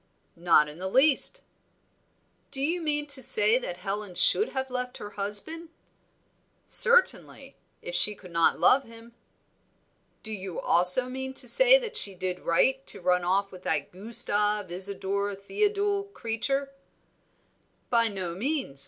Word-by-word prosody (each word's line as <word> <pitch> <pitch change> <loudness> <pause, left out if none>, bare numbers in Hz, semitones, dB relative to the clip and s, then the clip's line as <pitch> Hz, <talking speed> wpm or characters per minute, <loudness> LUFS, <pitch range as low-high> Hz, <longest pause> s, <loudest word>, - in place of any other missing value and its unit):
"Not 165 -3 +1
in 150 +3 -13
the 190 +1 -6
least." 280 - +2 1.1
"Do 270 - -9
you 330 +6 -3
mean 295 -2 -2
to 285 -2 -2
say 215 0 +3
that 175 -8 -7
Helen 195 0 -7
should 425 - +4
have 265 -1 -6
left 250 0 -6
her 205 - -11
husband?" 210 +12 +3 1.0
"Certainly, 485 0 +2 0.3
if - - -9
she 210 - +1
could 185 -3 -17
not 165 0 0
love 270 +1 +3
him." 230 0 -17 1.1
"Do 220 - -7
you 190 -4 -8
also 180 +9 +4
mean 265 +1 -8
to 255 - -3
say - - +6
that 480 -3 -5
she 200 -2 +7
did 180 0 -5
right 265 +11 -1
to - - -6
run 180 0 -1
off 195 +3 -2
with 185 - -14
that 145 -5 -2
Gustave 210 -1 -3
Isadore 200 +2 -2
Theodule 405 - -3
creature?" 275 - -5 1.2
"By 230 -1 +2
no 190 -5 -6
means. 245 - -5
220 Hz, 145 wpm, -24 LUFS, 190-275 Hz, 1.2 s, she